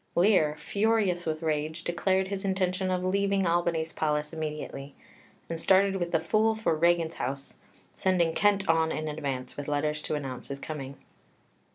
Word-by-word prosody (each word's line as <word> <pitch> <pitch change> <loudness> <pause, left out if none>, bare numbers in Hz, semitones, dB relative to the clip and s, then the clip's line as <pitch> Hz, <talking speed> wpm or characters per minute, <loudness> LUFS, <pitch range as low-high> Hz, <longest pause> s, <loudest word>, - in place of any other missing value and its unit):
Lear, 175 -5 +4
furious 200 -4 +1
with 155 +1 -2
rage, 155 +1 -1
declared 190 +2 +1
his 200 0 -4
intention 190 -1 0
of 180 -1 0
leaving 195 +1 +1
Albany's 170 -1 0
palace 150 0 -1
immediately, 150 -3 -5 0.5
and 165 -1 -4
started 195 +1 +4
with 175 -2 -2
the 165 - +2
Fool 215 +7 +2
for 220 -7 0
Regan's 170 0 +2
house, 135 +2 -3 0.4
sending 175 -3 +1
Kent 200 0 +2
on 160 -1 +3
in 155 0 -3
advance 140 -4 -4
with 145 - -5
letters 150 +1 0
to 155 - -2
announce 135 -4 -5
his 140 - -5
coming. 140 -3 -6
165 Hz, 160 wpm, -28 LUFS, 150-190 Hz, 0.5 s, Lear